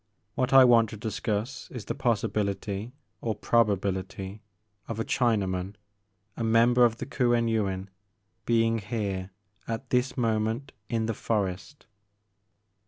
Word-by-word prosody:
What 125 +3 0
I 135 -1 +9
want 115 -3 +5
to 110 - -8
discuss 110 +3 -3
is 120 -5 -7
the - - -2
possi 115 -4 +1
bility 100 +1 -2 0.3
or 110 -2 -1
probability 100 -2 0 0.5
of 115 -1 -4
a 115 - -1
Chinaman, 100 -5 0 0.3
— 100 0 -46
a 115 - -3
member 115 +2 +5
of 115 -1 +1
the - - -5
Kuen 120 -3 +1
Yuin, 100 -4 -1 0.6
being 115 -1 +3
here, 100 -3 -3 0.4
at 115 +3 -5
this 125 +1 +1
moment, 115 +3 0 0.2
in 115 -1 0
the 115 - -1
forest." 100 +2 -3
110 Hz, 135 wpm, -28 LUFS, 100-120 Hz, 0.6 s, I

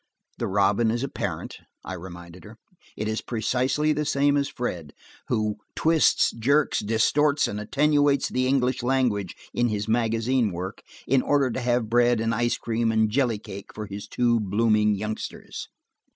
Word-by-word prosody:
"The - - -1
robin 100 +3 +2
is 120 +3 -1
a - - -1
parent," - - -5 0.3
I 95 - -5
reminded 85 0 -10
her. 110 +1 -13 0.4
"It 105 - -2
is 110 0 -2
precisely 130 +6 0
the 150 +1 -1
same 145 0 +2
as 140 -1 +1
Fred, 85 -11 -5 0.3
who 105 -1 0 0.2
twists, 160 -1 +3
jerks, 140 +6 +1
distorts 140 +7 +2
and 105 - -4
attenuates 145 +4 +2
the 130 0 0
English 130 -1 +1
language 120 -7 0 0.2
in 120 - +1
his 105 -1 -2
magazine 115 +1 +1
work, 90 +3 -6 0.2
in 135 0 +3
order 140 -2 +2
to 130 - -3
have 120 -2 +1
bread 120 +1 +3
and 115 +1 0
ice 120 +1 0
cream 115 0 -1
and 110 -1 +2
jelly 125 -2 +1
cake 100 -1 -10
for 105 - -5
his 100 +1 -7
two 120 +1 +1
blooming 105 +1 +2
youngsters." 105 +2 -6
115 Hz, 165 wpm, -25 LUFS, 105-130 Hz, 0.4 s, twists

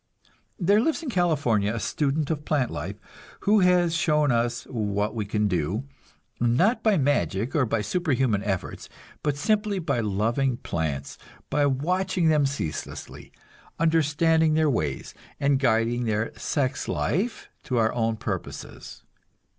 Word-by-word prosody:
There 200 +3 +3
lives 320 +5 0
in 275 - -3
California 145 - +1
a 115 - -3
student 145 +6 -1
of 150 -2 -3
plant 145 -5 0
life, - - -5 0.5
who 210 +1 +4
has 180 -2 +3
shown 150 -3 +2
us 120 0 0
what 105 -3 -2
we 110 -3 -3
can 105 +1 0
do, 90 - -1 0.6
not 125 - +2
by 215 -3 +3
magic 125 - 0
or 135 -5 +2
by 110 - 0
superhuman 130 - 0
efforts, 95 -3 -4 0.3
but 145 -2 -1
simply 210 +5 +1
by 145 -8 -1
loving 115 +5 0
plants, 75 - -4 0.3
by 145 -1 +3
watching 180 +5 +1
them 150 -3 +3
ceaselessly, 135 - -6 0.5
understanding 160 0 +3
their 155 -2 +3
ways, 75 - -2 0.3
and 140 -1 +2
guiding 120 -1 +1
their 110 0 -1
sex 135 -2 -1
life 215 +8 -1 0.2
to 125 - -1
our 110 -1 +2
own 115 -2 0
purposes. - - -6
135 Hz, 140 wpm, -25 LUFS, 110-160 Hz, 0.6 s, who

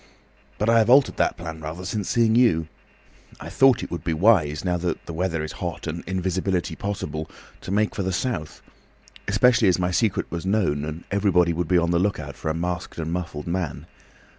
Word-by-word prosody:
But 105 - -1
I 115 0 +5
have 110 0 +2
altered 135 +2 +5
that - - +1
plan 80 -2 -7
rather 80 +4 -6
since 105 +1 -3
seeing 115 -2 +3
you. 100 -10 +3 0.7
I 80 - -8
thought 130 +7 +4
it - - -7
would 85 - -4
be 80 -1 -1
wise, 80 -5 +3
now 90 -1 +1
the 85 -1 -2 0.2
weather 85 -2 -1
is 80 - -5
hot - - -4
and - - -4
invisibility 95 0 -1
possible, 80 -6 -4 0.3
to - - -9
make 105 +2 +1
for - - -3
the 95 0 -1
South. 95 -5 -3 0.6
Especially 115 +4 +4
as 90 - +4
my 90 0 0
secret 105 +1 +1
was 85 -1 -4
known, 95 -8 0
and 80 +2 -6
everyone 90 -4 +3
would 85 0 -2
be 90 - +3
on 85 0 +2
the 85 - +2
lookout 100 +1 -2
for - - -4
a 80 - -1
masked 90 +1 -4
and 80 0 -3
muffled 80 -4 -4
man. 85 -2 -3
90 Hz, 200 wpm, -24 LUFS, 80-100 Hz, 0.7 s, I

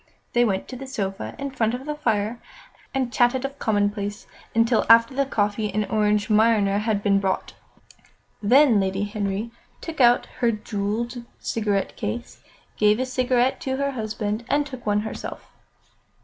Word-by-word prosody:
They 240 - +4
went 195 -5 0
to 255 - -6
the 270 +2 -8
sofa 195 -7 -4
in 280 -1 -4
front 235 -3 0
of 255 +2 -8
the 300 - -2
fire 230 -5 -1 0.5
and 260 -3 -2
chatted 245 +2 +2
of 275 +1 -6
commonplaces 205 -1 -1 0.3
until 230 0 +3
after 230 +2 +7
the 275 +1 0
coffee 210 -2 0
and 210 +2 0
Orange 210 -1 +2
Marnier 215 -2 +3
had 210 -1 -1
been 200 -1 +3
brought. 195 -1 -2 0.9
Then 245 +1 +5
Lady 190 +1 0
Henry 205 +1 -3 0.3
took 320 -4 -4
out 240 0 +5
her 240 -2 +3
jewelled 215 +3 -3
cigarette 205 -4 -1
case, 240 +1 -5 0.4
gave 210 +1 +4
a 260 - 0
cigarette 255 0 +1
to 265 -1 -2
her 280 0 0
husband 215 -2 -3
and 290 0 +2
took 255 -5 -9
one 205 0 +2
herself. 220 - -7
225 Hz, 160 wpm, -24 LUFS, 205-255 Hz, 0.9 s, after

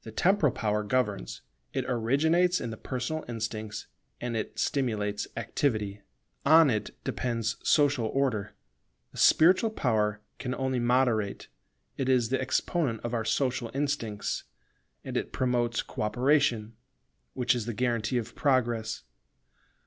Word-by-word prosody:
The 110 - -8
temporal 175 - +3
power 105 -1 0
governs: 105 - -1 0.3
it - - -1
originates 160 +10 +2
in 115 - -4
the - - -5
personal 130 +7 -3
instincts, 110 -2 -4 0.3
and 120 -1 -3
it 110 - -4
stimulates 105 -6 -1
activity. 105 -3 -1 0.4
On 160 0 +7
it 105 -2 -3
depends 115 -2 -2
social 145 -6 +3
Order. 115 -6 -1 0.6
The - - -9
spiritual 185 +7 +5
power 110 - 0 0.2
can 125 0 -3
only 130 -1 -1
moderate: 120 -4 +1 0.5
it 135 -1 -1
is 125 -3 +3
the 130 - 0
exponent 130 - 0
of 120 - -3
our 115 -2 0
social 125 0 0
instincts, 135 -7 -2 0.6
and - - -6
it - - -2
promotes 120 -2 0
co - - -7
operation, 120 -1 +2 0.6
which 125 -1 +2
is 120 -2 -3
the 120 - -2
guarantee 120 0 0
of 120 -1 -4
Progress. 120 -5 0
120 Hz, 135 wpm, -28 LUFS, 110-135 Hz, 0.6 s, On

